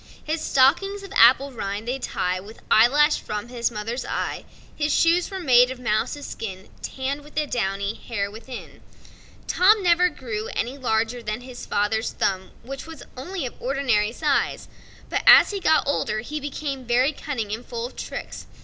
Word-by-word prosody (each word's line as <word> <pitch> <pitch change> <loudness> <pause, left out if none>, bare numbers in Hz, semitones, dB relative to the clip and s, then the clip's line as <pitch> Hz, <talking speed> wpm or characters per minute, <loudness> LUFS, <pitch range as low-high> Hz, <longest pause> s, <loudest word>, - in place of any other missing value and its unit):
His 310 +1 -2
stockings, 390 +12 +2
of 395 0 -9
apple 260 +4 +6
rind, 205 -2 -5
they 260 +2 -2
tie 180 -6 -2
With 205 +4 -12
eyelash 290 +7 +5
from 210 +2 -5
his 240 -2 -1
mother's 230 +2 -4
eye: - - -3 0.3
His 295 0 0
shoes 335 +4 +3
were 385 - -5
made 250 -6 +5
of 260 -1 -6
mouse's 235 +5 -1
skin, 190 -3 -7
Tann'd 270 +2 -3
with 295 - -16
the 305 0 +1
downy 200 -5 -2
hair 200 -4 -4
within. 235 +4 -10 0.6
Tom 405 +3 +4
never 355 0 +4
grew 225 -8 -5
any 245 +4 -2
larger 240 -2 -1
than 215 +1 -4
his 250 -1 -9
father's 220 +2 0
thumb, 190 -1 -1 0.2
but 275 +2 -6
as 325 -2 -10 2.5
he 400 - -3
got 315 -5 +3
older 215 -6 0
he 300 +6 -5
became 280 -1 -4
very 250 +4 +2
cunning 240 -9 -4
and 225 +3 -5
full 235 -1 -5
of 250 - -9
tricks. - - -7
250 Hz, 155 wpm, -24 LUFS, 220-295 Hz, 2.5 s, apple